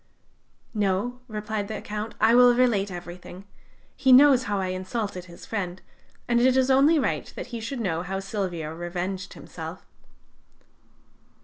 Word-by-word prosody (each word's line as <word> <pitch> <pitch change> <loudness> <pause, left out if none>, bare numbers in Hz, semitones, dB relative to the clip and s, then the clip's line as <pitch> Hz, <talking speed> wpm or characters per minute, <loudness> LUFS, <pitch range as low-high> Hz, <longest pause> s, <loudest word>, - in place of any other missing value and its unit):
"No," 210 +4 0
replied 215 -2 -4
the 215 -1 -4
Count: 210 +1 -5
"I 220 +2 +5
will 245 0 +7
relate 230 -6 +2
everything. 180 +1 -9 0.5
He 265 -1 +3
knows 260 -1 +7
how 205 -1 -1
I 190 -1 -1
insulted 185 0 -4
his 170 -1 -13
friend, 185 -4 -4 0.5
and 235 0 +3
it 260 +1 +4
is 260 0 +3
only 285 +5 +5
right 285 - -1
that - - -5
he 235 - -3
should 235 +4 -5
know 175 -7 -1
how 190 +2 -3
Silvio 185 -6 -4
revenged 175 +3 -4
himself." - - -9
205 Hz, 145 wpm, -25 LUFS, 185-245 Hz, 0.5 s, will